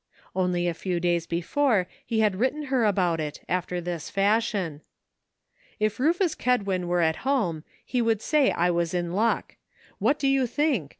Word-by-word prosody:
Only 180 -1 +1
a 175 - 0
few 175 +1 -2
days 170 -1 0
before 195 +5 +1 0.2
he 225 -1 0
had 210 -3 +2
written 265 +7 0
her 245 -4 +3
about 180 -5 +1
it, 150 -1 -4
after 180 0 -1
this 175 -2 -5
fashion: 200 -6 0 0.5
" - - -36
If 215 +1 0
Rufus 335 +4 +2
Kedwin 200 -8 0
were 175 0 +1
at 160 -1 +2
home 215 - 0 0.2
he 250 - 0
would 225 -2 +2
say 300 -3 +3
I 175 +1 +1
was 170 0 -1
in 175 -1 -2
luck. 225 +4 0 0.4
What 245 +9 +2
do 275 - 0
you 270 -2 +3
think? 265 - 0
195 Hz, 175 wpm, -26 LUFS, 175-250 Hz, 0.5 s, her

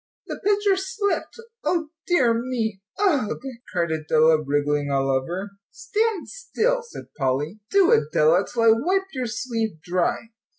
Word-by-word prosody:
"The - - -6
pitcher 410 -1 +3
slipped 385 +2 -2 0.3
O 330 -4 0 0.2
dear 265 -10 +4
me 230 -4 -2 0.2
ugh 300 - +1 0.2
" 235 - -20
cried 170 -4 0
Adela, 155 0 +3
wriggling 145 0 0
all 135 -1 +1
over. 175 +10 -2 0.2
"Stand 435 -4 -1
still," - - -1
said 470 - -12
Polly, 145 +8 -1
"do, 395 -3 +4
Adela, 155 +4 +3
till 235 -1 0
I 225 - +7
wipe 365 +13 +1
your 255 -3 -2
sleeve 225 -5 -3
dry." 180 +6 -1
230 Hz, 140 wpm, -23 LUFS, -, 0.3 s, I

